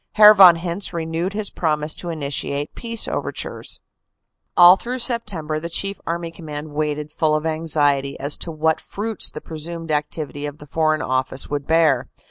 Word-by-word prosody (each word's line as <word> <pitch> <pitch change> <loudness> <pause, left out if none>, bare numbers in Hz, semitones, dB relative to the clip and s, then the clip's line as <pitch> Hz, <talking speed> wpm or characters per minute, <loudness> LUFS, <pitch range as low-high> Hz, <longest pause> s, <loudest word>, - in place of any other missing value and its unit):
Herr 210 0 +9
von 190 -4 +8
Hintze 175 +3 -4
renewed 165 +3 -3
his 210 -1 -1
promise 155 -2 0
to 175 - -5
initiate 145 -2 -2
peace 230 -1 -4
overtures. - - -4 0.8
"All 175 +1 +9
through 245 +6 -5
September, 205 -11 +1
the 170 +2 -6
Chief 195 +4 -1
Army 170 0 -3
Command 155 -2 -8
waited 150 0 -3
full 155 0 +1
of 155 +1 -2
anxiety 145 -4 0
as 140 +2 +3
to 170 - -4
what 160 0 0
fruits 215 +1 0
the 150 - -9
presumed 165 +1 -5
activity 150 -1 -3
of 145 0 -8
the 150 - -13
Foreign 155 +1 0
Office 130 +1 -1
would 145 -1 -3
bear. 160 -6 +2
160 Hz, 165 wpm, -21 LUFS, 150-175 Hz, 0.8 s, Herr